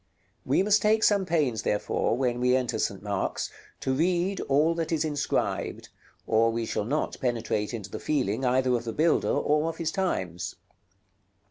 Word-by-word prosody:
We 140 +8 +3
must 210 +1 +3
take 215 +1 +3
some 200 -3 +3
pains, 145 -9 +1
therefore, 105 +2 0
when 125 -2 0
we 125 +1 +3
enter 130 -2 -1
St. 100 0 -2
Mark's, 100 -2 -2 0.3
to 130 - 0
read 175 +6 +1
all 150 +4 +4
that 165 -1 -3
is 160 -1 +1
inscribed, 145 -2 -2 0.4
or 115 +1 +3
we 115 0 -2
shall 105 - -2
not 145 +7 -2
penetrate 115 -4 -1
into 105 -5 -6
the - - -5
feeling 130 -5 -1
either 130 0 +2
of 120 - -3
the 115 - -3
builder 160 +4 +2
or 150 +2 +1
of 165 - -6
his 160 -1 -1
times. 95 - -2
130 Hz, 170 wpm, -27 LUFS, 115-165 Hz, 0.4 s, all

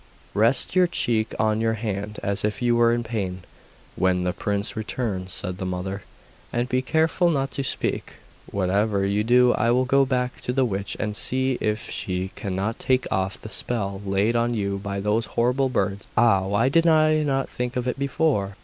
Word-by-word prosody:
'Rest 115 - +2
your 180 -1 +5
cheek 115 -9 0
on 110 0 +1
your 115 0 +1
hand, 105 -1 -4
as 100 -1 -1
if 105 0 -1
you 120 -1 +2
were 120 0 +4
in 120 0 0
pain, 95 -6 -4 0.5
when 90 -1 +1
the 90 0 0
prince 100 0 -2
returns,' 105 -4 -3
said 90 +1 -4
the - - -3
mother; 95 +2 -3 0.5
'and 120 +1 0
be 130 0 +1
careful 160 +6 +2
not 135 -4 0
to 140 - -3
speak, - - -2 0.4
whatever 100 +1 +1
you 100 +2 +1
do. 125 +2 +5
I 115 - +1
will 125 +2 +3
go 135 +2 +4
back 125 -1 -1
to 125 - -2
the 130 0 +2
witch 100 -3 -3
and 105 -1 -2
see 130 +2 -1
if 105 0 -1
she 90 0 -3
cannot 100 +3 -3
take 130 0 +1
off 95 0 -1
the - - -9
spell 100 -3 -2
laid 100 +4 +1
on 120 0 +1
you 100 -2 -1
by 100 0 -4
those 105 +3 0
horrible 125 +3 +2
birds. 100 -5 -1
Ah! 100 -5 +4
why 100 +5 +2
did 165 +5 +3
I 155 -1 +4
not 135 -2 0
think 125 0 -4
of 125 0 -1
it 125 - -2
before! 140 -8 0
110 Hz, 195 wpm, -24 LUFS, 100-125 Hz, 0.5 s, your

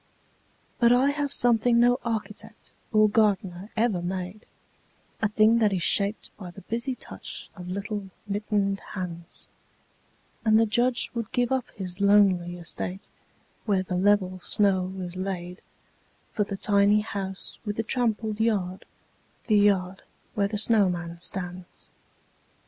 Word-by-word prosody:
But 235 -1 +5
I 260 +3 +4
have 285 -1 -2
something 235 -2 +4
no 245 +1 +4
architect 220 -1 -5 0.2
or 215 -1 +5
gardener 200 -3 0
ever 220 -6 +1
made, 185 +3 -5 0.7
A 220 - +3
thing 215 +2 +4
that 215 -2 +3
is 185 -3 -1
shaped 200 +2 +2
by 185 -4 -8
the 175 - -12
busy 235 +7 -3
touch - - -7
of 180 -2 -9
little 200 +1 -4 0.2
mittened 205 -1 -1
hands: 175 -3 -7 1.0
And 220 -1 +4
the 225 - +4
Judge 240 +3 +1
would 230 -2 -4
give 245 0 0
up 260 -2 -1
his 185 0 -5
lonely 195 -4 +3
estate, 180 +2 -4 0.6
where 195 -3 +2
the 185 -1 -4
level 185 -1 +2
snow 190 -1 +1
is 180 -1 -6
laid 185 -1 -5 0.7
For 210 - 0
the 200 -1 -5
tiny 205 +1 +3
house 195 -2 -5
with 205 -2 -3
the 225 - -1
trampled 220 -3 -1
yard, 195 -5 -1 0.6
the 215 - +2
yard 190 -2 +2 0.3
where 200 -1 +1
the 210 +1 -3
snowman 180 -6 +1
stands. 180 0 -6
205 Hz, 140 wpm, -26 LUFS, 185-220 Hz, 1.0 s, But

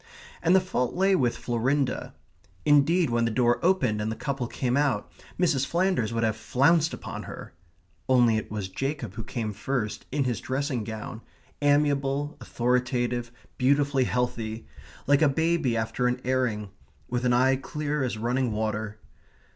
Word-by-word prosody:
And 175 +3 +4
the - - +7
fault 185 -10 -2
lay 190 +1 +3
with 120 -7 +1
Florinda. 130 +3 -1 0.5
Indeed, 150 +1 +4
when 115 0 +2
the - - +1
door 120 +1 +2
opened 130 - +2
and 110 +1 -1
the - - -3
couple 135 -2 -3
came 125 0 -1
out, 140 -7 0 0.3
Mrs. 160 -7 +2
Flanders 170 - +1
would 115 0 -1
have 110 -1 +1
flounced 150 +8 +2
upon - - -6
her - - -9 0.6
only 120 -3 +5
it 110 - -3
was 105 -3 -3
Jacob 135 +1 -4
who 115 +2 -6
came 110 -2 -4
first, 110 +1 -3
in 140 +1 +1
his 120 -3 -2
dressing 130 -2 -2
gown, 110 +1 -6 0.4
amiable, 145 0 +2
authoritative, 120 -1 0 0.3
beautifully 140 0 +3
healthy, 115 -3 -2 0.4
like 145 +1 +4
a 155 - +5
baby 160 -4 +1
after 110 +2 0
an 125 +1 0
airing, 120 -6 0 0.4
with 125 0 -2
an 125 - +2
eye 130 +2 +4
clear 150 +1 -3
as 120 -4 -2
running 120 +2 0
water. 110 0 -2
125 Hz, 155 wpm, -27 LUFS, 115-145 Hz, 0.6 s, the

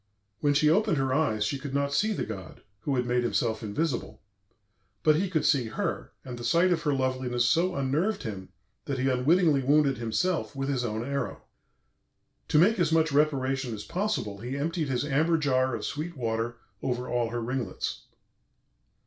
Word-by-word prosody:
When 145 +2 +2
she 150 +1 +4
opened 165 0 +3
her 135 -1 +1
eyes 120 -8 +1
she 140 +5 -2
could 140 0 -5
not 140 0 0
see 215 +8 +2
the 210 - -2
god, 95 -5 -8 0.2
who 135 +6 -1
had 125 -1 0
made 125 0 +1
himself 120 -1 0
invisible, 120 +6 -2 0.8
but 155 -1 +5
he 185 +4 0
could 160 -4 0
see 135 -5 +3
her, 110 - -3
and 125 -2 -7
the - - -7
sight 170 +8 +3
of 165 -2 +1
her 145 - +1
loveliness 130 -2 0
so 170 +9 +2
unnerved 150 +10 0
him 95 -4 -6 0.4
that 140 - -2
he 130 +1 0
unwittingly 150 +3 +3
wounded 140 0 +3
himself 145 +9 -1
with 135 0 -2
his 130 -3 0
own 110 0 -2
arrow. 140 +1 -3 1.0
To - - +2
make 200 +7 +5
as 170 -2 +2
much 160 -1 +3
reparation 135 -4 +1
as 105 - -7
possible 180 - -2
he 125 +5 -4
emptied 160 +1 -1
his 130 +1 0
amber 155 +4 +2
jar 130 -4 +1
of 110 - -4
sweet 155 +2 -4
water 115 0 -2 0.3
over 125 0 -2
all 120 -2 0
her 120 +1 -3
ringlets. 120 -4 -3
135 Hz, 185 wpm, -28 LUFS, 120-155 Hz, 1.0 s, but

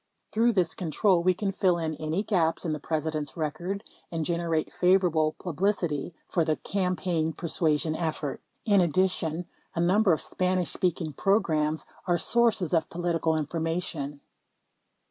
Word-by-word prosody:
Through 230 +2 +3
this 180 -5 +2
control, 180 +2 +2
we 185 +1 +3
can 195 +1 -1
fill 185 -2 +2
in 160 -2 -2
any 155 +6 -1
gaps 175 -5 +1
in 160 - 0
the 155 - -3
President's 155 -1 -3
record 175 +6 -3 0.3
and 165 -2 -2
generate 170 -2 -1
favorable 180 -4 +3
publicity 175 -3 -1
for 170 - +1
the 155 -1 +1
campaign 180 -4 -1
persuasion 155 -1 0
effort. 160 -4 -3 0.2
In 205 -4 +5
addition, 175 -1 +1 0.3
a - - -1
number 190 +4 +4
of 160 - +2
Spanish 185 -1 0
speaking 170 -4 -1
programs 155 -4 +1 0.2
are 175 -1 +3
sources 220 -4 +2
of 160 -2 +2
political 170 -2 0
information. 155 -2 -3
170 Hz, 140 wpm, -27 LUFS, 155-185 Hz, 0.3 s, In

